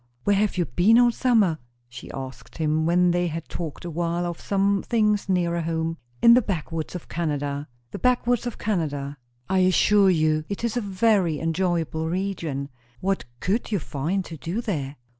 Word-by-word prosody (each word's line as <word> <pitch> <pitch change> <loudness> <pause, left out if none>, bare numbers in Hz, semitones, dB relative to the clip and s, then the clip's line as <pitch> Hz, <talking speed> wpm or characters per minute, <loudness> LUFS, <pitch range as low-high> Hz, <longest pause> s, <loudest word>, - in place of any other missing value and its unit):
"Where 205 - +3
have 205 -1 +1
you 175 - +2
been 210 +9 +4
all 240 0 +6
summer?" 220 -10 +2 0.3
she 120 +1 -10
asked 130 -3 -8
him, 155 0 +1
when 175 +1 +4
they 175 0 +1
had 165 0 -5
talked 165 -1 -6
awhile 170 +1 -1
of 175 -1 -5
some 200 0 +1
things 210 -4 +1
nearer 170 -2 +1
home. 165 0 -2 0.3
"In 235 - +9
the 250 - +6
backwoods 165 -5 -4
of 175 - -7
Canada." 145 -3 -2 0.2
"The - - -6
backwoods 245 -1 +2
of 240 - -5
Canada!" 145 -8 -2 0.3
"I 190 - +2
assure 190 +2 +4
you 155 -3 +2
it 200 +2 -4
is 235 -1 -1
a 245 - 0
very 195 -5 +2
enjoyable 165 -1 -1
region." 165 -7 -3 0.3
"What 195 -9 -1
could 215 +5 -1
you 205 - +2
find 170 +4 -2
to 165 - -8
do 170 - -3
there?" 150 - -3
175 Hz, 175 wpm, -24 LUFS, 160-200 Hz, 0.3 s, In